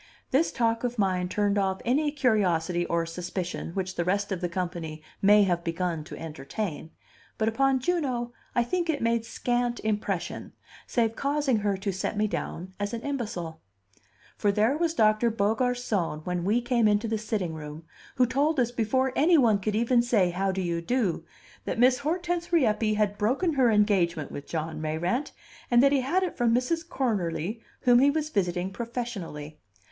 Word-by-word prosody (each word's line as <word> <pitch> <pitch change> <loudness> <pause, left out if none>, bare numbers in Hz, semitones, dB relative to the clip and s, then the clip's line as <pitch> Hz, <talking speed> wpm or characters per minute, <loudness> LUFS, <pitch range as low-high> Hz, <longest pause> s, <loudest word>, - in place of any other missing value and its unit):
This 290 +5 +3
talk 230 -1 0
of 245 0 -2
mine 185 -3 +1
turned 205 +1 +1
off 190 -1 0
any 290 +5 +2
curiosity 180 - +1
or 170 0 0
suspicion 180 +1 -4
which 190 -1 -2
the 170 - -1
rest 200 +3 0
of 190 -2 -2
the 175 - -1
company 170 -3 -4 0.2
may 205 +1 +6
have 175 -3 0
begun 165 -1 -2
to - - -9
entertain; 160 +2 -5 0.5
but 220 - 0
upon 265 +4 +2
Juno 255 -6 -1 0.2
I 240 - +4
think 345 +7 -1
it 290 -6 0
made 230 0 +1
scant 240 0 -1
impression, 215 -1 -3 0.3
save 230 -2 +1
causing 280 -2 +1
her 205 -2 0
to 195 +1 -2
set 190 +3 -3
me 210 - +2
down 185 -3 -4
as 205 +3 -2
an 230 - -5
imbecile. 210 - -4 0.7
For 205 - +1
there 220 +6 +2
was 330 +1 0
Doctor 215 +1 +3
Beaugarcon 220 - 0
when 180 -1 -2
we 220 +5 +2
came 240 -2 +2
into 210 +2 +2
the 220 -1 -1
sitting 210 -6 -2
room, 155 0 -8 0.3
who 255 -2 +4
told 280 +4 +1
us 240 -1 +2
before 250 +3 0
any 330 +4 +5
one 225 -7 +4
could 210 +2 -2
even 235 +2 +3
say 215 -7 +2
"How 190 +2 0
do 190 0 -2
you 170 -1 -1
do," 190 -5 -1 0.4
that - - -2
Miss 250 +2 +4
Hortense 345 +3 -2
Rieppe 220 -9 +2
had 205 -1 0
broken 275 - +1
her 260 -4 +4
engagement 190 -8 +2
with 145 - -7
John 160 -1 -4
Mayrant, 175 - -1 0.4
and 240 +1 +5
that 275 - +5
he 280 -2 +3
had 345 +9 +1
it 360 - -3
from 235 -2 +3
Mrs. 325 +7 -1
Cornerly, 210 - -2 0.2
whom 245 -1 +5
he 275 +2 +5
was 305 +1 -1
visiting 180 - -1
professionally. 200 -11 -5
215 Hz, 180 wpm, -27 LUFS, 180-250 Hz, 0.7 s, may